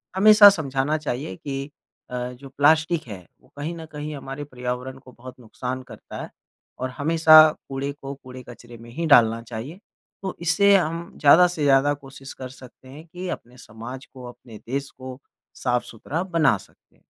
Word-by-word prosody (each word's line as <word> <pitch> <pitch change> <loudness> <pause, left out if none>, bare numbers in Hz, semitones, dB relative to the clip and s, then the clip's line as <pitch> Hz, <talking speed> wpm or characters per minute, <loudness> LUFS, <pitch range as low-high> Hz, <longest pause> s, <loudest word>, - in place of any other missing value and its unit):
हमेशा 210 +1 +9
समझाना 150 -4 -1
चाहिए 135 -8 -4
कि 135 +5 -5 0.5
अ, - - -4 0.2
जो 135 +2 -13
प्लास्टिक 155 +3 +2
है 95 -5 -9 0.2
वो 130 - -26
कहीं 155 +4 -4
न 160 - -8
कहीं 150 0 -5
हमारे 135 +1 -7
पर्यावरण 125 -1 -5
को 130 -1 -16
बहुत 130 +1 -12
नुकसान 125 +2 -6
करता - - -9
है - - -9 0.5
और 130 - -2
हमेशा 155 +1 +7 0.3
कूड़े 135 +1 -3
को 135 0 -6
कूड़े-कचरे 125 -2 -12
में 115 +1 -13
ही 165 +7 -3
डालना 115 -5 +5
चाहिए। 120 - -8 0.4
तो 190 - -4
इससे 185 +4 +4
हम 170 -1 -1
ज़्यादा 160 +5 +7
से 175 -4 -4
ज़्यादा 140 +1 +4
कोशिश 135 -1 -11
कर 130 -1 -8
सकते 130 0 -15
हैं 150 +4 -12
कि 180 +3 -7
अपने 125 -4 -7
समाज 125 +2 -10
को 130 -2 -11
अपने 120 -2 -13
देश 140 +2 -3
को 130 -1 -8 0.5
साफ़-सुथरा 125 +5 -2
बना 160 - +2
सकें। 95 - -22
135 Hz, 170 wpm, -23 LUFS, 125-155 Hz, 0.5 s, हमेशा